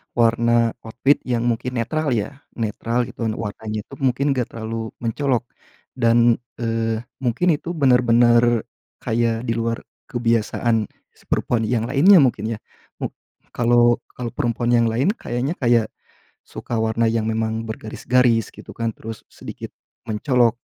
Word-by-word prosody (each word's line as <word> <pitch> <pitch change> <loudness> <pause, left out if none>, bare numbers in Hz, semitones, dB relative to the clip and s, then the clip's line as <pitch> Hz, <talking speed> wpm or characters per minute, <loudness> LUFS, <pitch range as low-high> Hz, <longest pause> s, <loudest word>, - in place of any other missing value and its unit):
warna 115 0 +3
outfit 125 +5 +2
yang 120 -2 0
mungkin 120 +2 -1
netral, 145 +4 0
ya? 115 +6 -3 0.2
Netral, 115 +2 -1
gitu. 115 - -4
Warnanya 110 0 -4
itu - - -17
mungkin 135 +2 +1
enggak 125 -3 0
terlalu 115 0 -5
mencolok, 125 +2 0 0.5
dan, 115 -1 +4 0.2
eee, 115 -1 -1 0.2
mungkin 125 +6 0
itu 165 - -8
benar-benar 120 -4 +4 0.4
kayak 115 0 0
di 115 -2 -1
luar 115 0 -2 0.3
kebiasaan 115 -2 +1 0.4
perempuan 115 -2 0
yang 115 -1 0
lainnya, 180 +11 +6
mungkin, 115 -3 0
ya? - - -25 0.4
Mu - - -2 0.4
kalau 120 0 +3 0.2
kalau 120 -1 -4
perempuan 120 0 -1
yang 115 -1 +4
lain 130 - +1
kayaknya 130 - -3
kayak 120 -7 +2 0.6
suka 120 - -5
warna 110 +1 +1
yang 110 -1 0
memang 110 0 -1
bergaris-garis, 115 +1 0
gitu, - - -14
kan, 115 -1 -1
terus 110 0 -9
sedikit - - -9 0.3
mencolok. 120 +2 +2
115 Hz, 135 wpm, -21 LUFS, 115-125 Hz, 0.6 s, lainnya